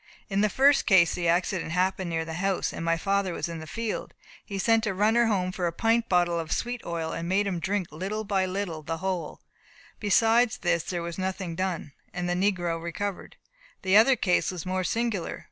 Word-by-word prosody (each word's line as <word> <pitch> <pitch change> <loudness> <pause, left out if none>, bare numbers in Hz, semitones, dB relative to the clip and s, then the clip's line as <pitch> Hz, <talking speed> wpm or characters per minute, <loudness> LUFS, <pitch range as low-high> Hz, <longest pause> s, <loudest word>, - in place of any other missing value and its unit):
In 195 0 +1
the 210 - +3
first 275 +5 +4
case 185 -5 +5
the 175 -1 -1
accident 175 0 0
happened 185 0 0
near 165 -1 -1
the 160 - -6
house, 190 +2 -1
and - - -5
my 165 0 +1
father 195 +1 0
was - - -3
in 165 -1 -6
the 160 - -9
field. 225 +6 -4 0.3
He 200 - -6
sent 225 +2 +2
a 195 - -1
runner 220 +4 +3
home 185 -4 0
for 180 -1 -2
a - - -1
pint 230 +6 +1
bottle 175 -2 +2
of 160 -1 -5
sweet 245 0 -2
oil, 165 -1 -3
and 170 +1 -4
made 200 +2 +2
him 185 -3 -2
drink 190 0 -1
by - - -12
little 200 +5 -3
and 190 -2 +1
little 185 -5 -3
the 165 +2 -4
whole. 180 -3 -3 0.6
Beside 225 +3 +4
this 170 -2 +2
there 175 -2 -3
was 170 +1 -5
nothing 185 -2 -3
done, 180 -5 -3 0.2
and 180 -1 -2
the 175 - +1
negro 180 -3 0
recovered. 190 +3 -5 0.5
The 190 0 +3
other 230 +5 +7
case 180 -6 +1
was 180 -2 -5
more 185 0 -1
singular. 225 -1 -2
185 Hz, 215 wpm, -27 LUFS, 170-205 Hz, 0.6 s, other